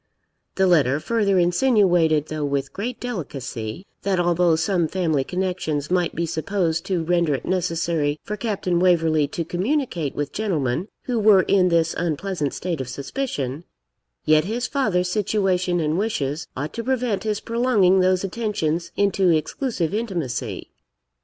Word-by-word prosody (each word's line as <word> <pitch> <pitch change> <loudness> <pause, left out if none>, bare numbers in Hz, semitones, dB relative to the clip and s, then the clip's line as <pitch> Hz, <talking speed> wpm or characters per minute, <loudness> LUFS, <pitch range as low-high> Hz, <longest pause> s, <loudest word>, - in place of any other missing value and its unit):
The 190 - +3
letter 145 -6 +3
further 205 0 +1
insinuated, 175 - +3
though 155 -1 -3
with 140 -1 -2
great 235 +5 -4
delicacy, 140 - -5 0.2
that 190 -2 0
although 175 -1 +3
some 165 +1 +1
family 160 -6 0
connections 180 -3 -2
might 180 -2 +1
be 170 - 0
supposed 165 0 -1
to 180 -4 0
render 170 -3 +2
it 130 - -6
necessary 165 -4 0
for 210 - -4
Captain 195 -5 -1
Waverley 165 -4 +3
to 165 +3 -4
communicate 180 - -1
with 145 -1 -3
gentlemen 170 - -1 0.2
who 245 -3 -1
were 205 -3 +6
in 185 -2 +3
this 165 -1 +2
unpleasant 165 -2 -2
state 170 -6 -3
of 130 - -6
suspicion, 140 - -4 0.6
yet 155 +1 +4
his 235 +5 -2
father's 195 -11 0
situation 185 -3 +1
and 155 +2 0
wishes 160 -9 -2
ought 145 +3 -4
to 230 - -4
prevent 245 -6 0
his 215 -1 -1
prolonging 230 -6 +3
those 185 0 +2
attentions 190 -6 -2
into 195 -2 +2
exclusive 170 - 0
intimacy. 190 - -3
175 Hz, 145 wpm, -23 LUFS, 155-200 Hz, 0.6 s, were